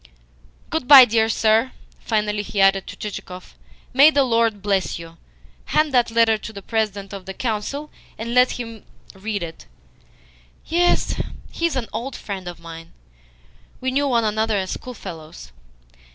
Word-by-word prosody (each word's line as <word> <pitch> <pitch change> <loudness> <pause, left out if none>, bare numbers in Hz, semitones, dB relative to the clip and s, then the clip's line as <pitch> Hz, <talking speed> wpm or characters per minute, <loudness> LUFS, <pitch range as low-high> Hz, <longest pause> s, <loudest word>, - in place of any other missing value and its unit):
"Good 315 -6 -2
bye, 270 -3 +11
dear 225 -1 +2
sir," 225 +3 +2 0.3
finally 210 -2 -1
he 205 0 -5
added 195 0 +4
to - - -8
Chichikov. 185 -3 -8 0.4
"May 275 +4 +8
the 285 -3 +3
Lord 230 -5 +1
bless 195 -2 0
you! 165 0 -11 0.5
Hand 305 -2 +1
that 245 -2 +3
letter 225 -1 +3
to 220 - -8
the 200 -2 -10
President 205 -3 -2
of 195 -1 -8
the 190 - -6
Council, 255 +7 -3 0.3
and 230 +2 -4
let 250 +1 +4
him 230 -3 -7 0.3
read 205 0 -4
it. 165 - -9 1.0
Yes, 350 +2 +1 0.3
he 335 - 0
is 330 - -4
an 255 -3 -1
old 245 +4 -4
friend 190 -3 -6
of 175 -1 -7
mine. 165 0 -11 0.9
We 260 0 -1
knew 285 +2 +1
one 235 -3 +2
another 220 0 0
as 190 -1 -2
schoolfellows." 170 -10 -9
220 Hz, 155 wpm, -22 LUFS, 195-250 Hz, 1.0 s, bye